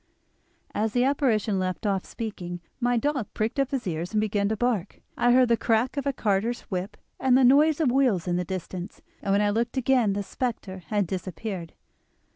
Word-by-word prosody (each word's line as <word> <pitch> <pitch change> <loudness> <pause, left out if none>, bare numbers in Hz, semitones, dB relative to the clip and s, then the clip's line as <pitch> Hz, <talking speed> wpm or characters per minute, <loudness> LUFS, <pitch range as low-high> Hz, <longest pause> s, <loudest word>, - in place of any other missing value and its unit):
"As 215 0 -1
the 245 - +3
apparition 230 -7 +1
left 185 +2 -3
off 195 -2 0
speaking 180 -6 -6 0.2
my 245 -1 +2
dog 270 -3 0
pricked 220 +5 -1
up 275 -1 +2
his 270 -3 -2
ears 170 +2 -3
and - - +4
began 205 -1 0
to 220 - -1
bark. 220 -5 -1 0.2
I 245 - +3
heard 255 0 +5
the 235 - +5
crack 230 +4 +1
of 280 0 -2
a - - +3
carter's 225 -1 0
whip 190 0 -5 0.2
and 260 -1 +4
the 265 - +4
noise 290 +5 +5
of 295 -6 +3
wheels 245 -10 +2
in 175 - +1
the 180 - 0
distance, 185 0 -6 0.2
and 195 - -1
when 200 +1 +3
I 205 - +2
looked 235 +4 -1
again 250 -5 +3
the 200 +1 -2
spectre 215 -5 -4
had 205 +1 +1
disappeared." 185 0 -5
220 Hz, 200 wpm, -26 LUFS, 190-250 Hz, 0.2 s, heard